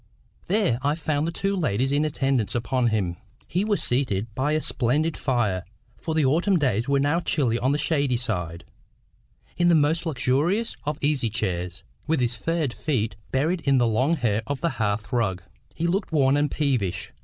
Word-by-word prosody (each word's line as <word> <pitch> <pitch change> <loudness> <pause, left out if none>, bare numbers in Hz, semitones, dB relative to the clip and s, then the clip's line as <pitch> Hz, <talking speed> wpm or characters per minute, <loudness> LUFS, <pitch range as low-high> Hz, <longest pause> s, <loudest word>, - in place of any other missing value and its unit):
There 190 - +1
I 145 +2 +1
found 155 -1 -1
the - - -1
two 195 +3 -1
ladies 135 - 0
in 145 +1 +2
attendance 135 -7 0
upon 125 +1 +1
him. 95 -6 -1 0.3
He 180 +3 0
was 210 -1 +1
seated 115 -4 0
by 135 +6 0
a 155 - +2
splendid 150 +4 +1
fire, 105 -9 0 0.3
for 160 -2 -4
the 155 -3 +3
autumn 175 +8 +3
days 130 -4 0
were 140 0 +3
now 145 +4 +2
chilly 130 -9 0
on 130 +3 +1
the 145 - +1
shady 140 -4 +1
side, 90 -8 -3 0.9
in 175 0 +3
the 170 - +5
most 160 +3 +2
luxurious 160 - 0
of 150 0 -2
easy 140 -5 +1
chairs, 90 -6 -3 0.2
with 160 -1 +1
his 120 -1 +1
furred 160 -1 -1
feet 120 -8 -1 0.2
buried 160 +7 0
in 140 -3 +3
the 120 - +3
long 125 +8 +2
hair 115 -7 0
of 140 -1 -2
the 170 - +1
hearth 105 +1 -1
rug. 95 -7 0 0.3
He 165 - -2
looked 185 +4 0
worn 140 -3 +3
and 145 0 +2
peevish. 115 - -1
135 Hz, 185 wpm, -25 LUFS, 115-155 Hz, 0.9 s, the